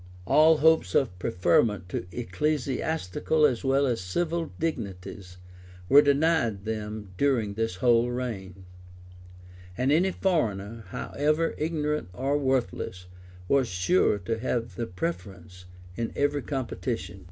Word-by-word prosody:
All 155 - +5
hopes 160 +2 +3
of 90 -10 +1
preferment 90 +2 +1
to 90 - -4
ecclesiastical 140 - 0
as 125 -5 +1
well 135 +1 +3
as 120 -6 -1
civil 165 - -2
dignities 95 - -5 0.5
were 140 +1 +9
denied 140 -8 +1
them 105 -2 -5
during 120 -7 +1
this 115 -3 -2
whole 120 +3 +3
reign; 100 -7 -5 1.1
and 130 +2 +1
any 175 +5 +4
foreigner, 115 - -1
however 150 - -1
ignorant 150 - -2
or 135 +7 -1
worthless, 130 -9 -1 0.4
was 135 +1 +3
sure 95 - +2
to 110 +4 -3
have 115 -1 -2
the 115 -1 -4
preference 90 0 -6 0.3
in 115 +2 -3
every 145 0 +1
competition. 120 - -4
120 Hz, 120 wpm, -27 LUFS, 95-145 Hz, 1.1 s, were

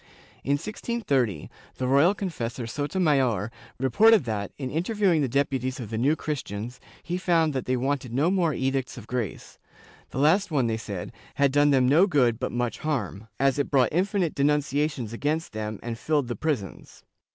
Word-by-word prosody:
^ - - -29 0.4
In 140 - +1
1630, 145 - -1 0.3
the 130 - -1
royal 140 +9 +4
confessor 125 - -4
Sotomayor 140 - 0 0.3
reported 210 - +5
that, 105 -4 -3
in 130 -3 -4
interviewing 180 0 +1
the 135 - 0
depu 135 0 0
ties 130 +1 -3
of 115 -3 -7
the 110 - -2
New 140 +6 +3
Christians, 125 -6 -5 0.2
he 175 +3 -3
found 165 -4 +2
that 130 - -3
they 130 0 0
wanted 135 -1 -2
no 145 +8 +2
more 180 -4 +2
Edicts 135 -1 -2
of 115 - -9
Grace; 120 -6 -5 0.5
the - - -8
last 165 +9 +3
one, 140 -6 +1
they 115 -1 0
said, 100 -5 -6 0.2
had 140 -1 +3
done 145 +1 +4
them 130 -3 +4
no 160 +9 +5
good 125 - +2
but 130 - -2
much 120 -1 -2
harm, 115 - -3
as 135 +1 +2
it 140 - 0
brought 135 -3 +3
infinite 185 -1 +1
denunciations 145 -3 0
against 150 +5 -2
them 110 -1 -4
and 115 -1 -5
filled 145 -1 0
the 120 - -2
prisons. 135 - -4
135 Hz, 180 wpm, -26 LUFS, 120-155 Hz, 0.5 s, reported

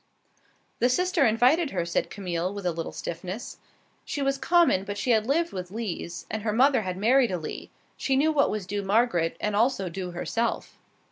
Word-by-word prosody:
"The 245 - +3
sister 360 0 +2
invited 255 +9 +3
her," 175 -7 -2
said 170 - -1
Camille, 180 -2 -3
with 200 -1 -7
a 175 - +2
little 165 0 -5
stiffness. 185 +6 -6 0.4
She 285 - -3
was 275 0 0
common, 335 - +3
but 205 0 -5
she 240 +5 0
had 220 -1 +2
lived 330 +5 +1
with 180 -2 -5
Lees, 195 -5 -5
and 220 +1 -3
her 215 0 -1
mother 260 +1 +4
had 185 -3 -4
married 240 +4 +4
a 180 - -1
Lee. 155 -2 -7 0.3
She 270 - 0
knew 300 +4 +3
what 290 -2 +3
was 210 -3 -3
due 205 +2 -3
Margaret, 195 -5 +1
and 210 -1 -1
also 215 -4 +1
due 180 +1 -5
herself. 230 +6 -3
215 Hz, 195 wpm, -26 LUFS, 185-265 Hz, 0.4 s, mother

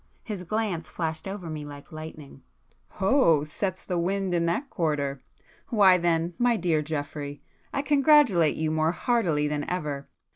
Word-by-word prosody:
His 205 -4 -5
glance 190 -3 -2
flashed 160 0 -3
over 195 -3 -5
me 155 -2 -5
like 145 -1 -10
lightning. 155 -3 -9 0.6
"Oh!—sets 185 - +2
the 180 -2 -1
wind 190 +1 -1
in 170 -1 +1
that 210 +12 -1
quarter! 145 -5 -1 0.5
Why 195 -5 +5
then, 170 0 +1
my 240 -1 +3
dear 165 -4 +1
Geoffrey, 145 -1 -5 0.3
I 275 - -1
congratulate 280 - +4
you 155 0 -1
more 160 +1 +1
heartily 175 - +1
than 150 0 -2
ever. 150 -6 -3
170 Hz, 145 wpm, -26 LUFS, 150-195 Hz, 0.6 s, Why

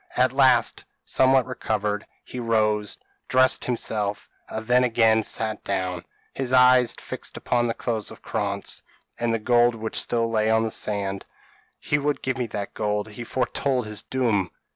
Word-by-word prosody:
At 130 0 +3
last, 130 -3 +3 0.2
somewhat 130 -1 +3
recovered, 105 -4 -2 0.2
he 125 - -7
rose, 105 -3 +1 0.3
dressed 130 0 +4
himself, 105 -4 -2 0.2
and 110 0 -5
then 125 +2 +4
again 115 -2 +4
sat 110 0 -2
down 95 -3 -2 0.3
his 130 -2 -3
eyes 125 -1 +5
fixed - - -7
upon 120 -1 0
the 115 - -2
clothes 110 -3 -3
of - - -13
Krantz, 100 -2 -3 0.4
and 120 -1 0
the 115 - +1
gold 120 +1 +3
which 110 0 -2
still 115 -1 0
lay 110 -1 +1
on 110 0 +3
the 110 - -2
sand. 100 -2 -2 0.6
"He 145 - 0
would 145 -1 -1
give 130 0 -2
me 125 - -1
that 100 -2 -5
gold. 105 0 -2
He 110 +3 -8
foretold 125 +1 -1
his 105 -1 -4
doom. 110 -8 0
115 Hz, 165 wpm, -24 LUFS, 105-125 Hz, 0.6 s, eyes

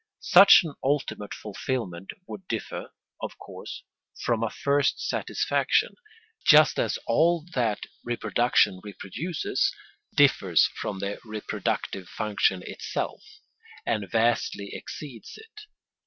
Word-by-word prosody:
Such 195 +1 +9
an 160 -4 -6
ultimate 135 -7 -1
fulfilment 100 -4 -4 0.2
would 190 -1 -9
differ, 115 - -4 0.3
of - - -6
course, - - -9 0.4
from 115 -2 +1
a 115 - 0
first 140 0 +1
satisfaction, - - 0 0.5
just - - +6
as - - 0
all 170 0 +2
that 115 -6 0 0.2
reproduction 120 -5 +2
reproduces 105 - -2 0.4
differs - - +4
from 100 - -4
the 100 +1 -4
reproductive 105 -4 -3
function 100 -3 0
itself, - - -4 0.6
and 105 -4 -1
vastly 115 -2 0
exceeds 135 -7 -8
it. 440 -1 -14
115 Hz, 105 wpm, -26 LUFS, 100-150 Hz, 0.6 s, Such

